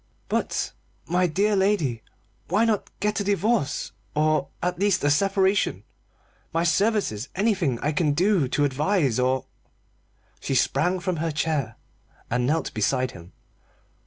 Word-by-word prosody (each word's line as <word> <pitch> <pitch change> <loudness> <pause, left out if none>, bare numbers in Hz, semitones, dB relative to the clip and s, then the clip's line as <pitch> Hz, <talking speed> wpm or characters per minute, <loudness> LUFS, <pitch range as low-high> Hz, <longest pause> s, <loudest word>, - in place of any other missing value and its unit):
"But, - - -1 0.3
my 180 +2 +2
dear 200 +6 +1
lady, 190 - +1 0.5
why 205 +6 +2
not 220 -3 0
get 210 +2 0
a - - 0
divorce 200 - 0 0.2
or, 155 -2 +2
at 180 0 -2
least, 200 -4 +2
a 145 - +3
separation? 195 - +2 0.7
My 165 +1 0
services 175 - +1
anything 190 - +1
I 150 - +1
can 150 -1 +1
do 180 -2 +2
to 145 +3 +1
advise 145 - +1
or 130 +1 +1 0.5
" - - -40
She 135 - -2
sprang 165 +9 +2
from 180 -2 -1
her 165 +1 -1
chair 145 -6 -1 0.6
and 125 +1 +1
knelt 160 +3 0
beside 130 +4 0
him. 85 0 -13
165 Hz, 140 wpm, -25 LUFS, 135-195 Hz, 0.7 s, a